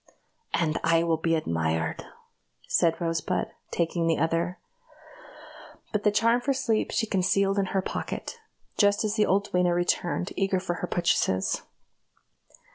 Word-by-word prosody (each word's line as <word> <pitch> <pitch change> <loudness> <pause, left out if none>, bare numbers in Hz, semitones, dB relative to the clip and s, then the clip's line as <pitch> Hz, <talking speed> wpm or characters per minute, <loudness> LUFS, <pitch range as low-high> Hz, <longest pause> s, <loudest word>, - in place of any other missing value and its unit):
"And 160 -2 0
I 165 0 +3
will 165 -1 +1
be 165 +1 +1
admired," 80 - -1 0.6
said 165 -1 +2
Rosebud, 165 +1 -1 0.2
taking 170 0 0
the 165 - +2
other; 165 +3 0 1.3
but 210 - 0
the 210 - +4
charm 230 +3 +3
for 275 +2 +1
sleep 230 -4 0
she 225 - +1
concealed 195 0 +1
in 195 - +2
her 190 0 -1
pocket, 475 - -5 0.4
just 205 0 +4
as 215 -1 0
the 215 -1 +2
old 200 +2 +1
duenna 180 -1 +2
returned, 175 +1 0
eager 195 -1 +1
for 175 -2 -3
her 180 - -2
purchases. 130 - +1
180 Hz, 140 wpm, -27 LUFS, 165-205 Hz, 1.3 s, the